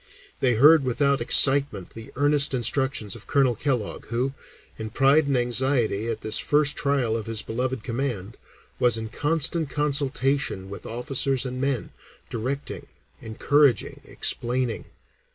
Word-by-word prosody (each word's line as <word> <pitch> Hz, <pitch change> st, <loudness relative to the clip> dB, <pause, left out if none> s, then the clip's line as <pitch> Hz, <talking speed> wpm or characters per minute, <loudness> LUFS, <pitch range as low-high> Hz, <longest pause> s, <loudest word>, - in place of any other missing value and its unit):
They 125 Hz, -3 st, +1 dB
heard 150 Hz, +5 st, +6 dB
without 135 Hz, +2 st, 0 dB
excitement 135 Hz, -5 st, +4 dB
the 115 Hz, 0 st, -12 dB
earnest 145 Hz, -1 st, +2 dB
instructions 120 Hz, -3 st, 0 dB
of 115 Hz, -, -12 dB
Colonel 135 Hz, -3 st, +2 dB
Kellogg, 120 Hz, -2 st, -4 dB
who, 125 Hz, +4 st, -2 dB, 0.5 s
in 110 Hz, 0 st, -5 dB
pride 140 Hz, +6 st, +2 dB
and 140 Hz, -2 st, 0 dB
anxiety 120 Hz, -3 st, 0 dB
at 115 Hz, -2 st, -4 dB
this 110 Hz, -, +2 dB
first 150 Hz, 0 st, +1 dB
trial 140 Hz, -6 st, 0 dB
of 115 Hz, -1 st, -5 dB
his 115 Hz, -1 st, -2 dB
beloved 125 Hz, +1 st, -4 dB
command, 115 Hz, -5 st, -4 dB, 0.4 s
was 120 Hz, -2 st, +2 dB
in 110 Hz, 0 st, -6 dB
constant 160 Hz, +3 st, 0 dB
consultation 140 Hz, -7 st, -1 dB
with 100 Hz, -, -9 dB
officers 135 Hz, +2 st, -1 dB
and 130 Hz, 0 st, -5 dB
men, 135 Hz, -4 st, -2 dB, 0.4 s
directing, 130 Hz, +5 st, -5 dB, 0.3 s
encouraging, 130 Hz, +2 st, 0 dB
explaining. 120 Hz, -1 st, -2 dB
130 Hz, 135 wpm, -24 LUFS, 115-140 Hz, 0.5 s, heard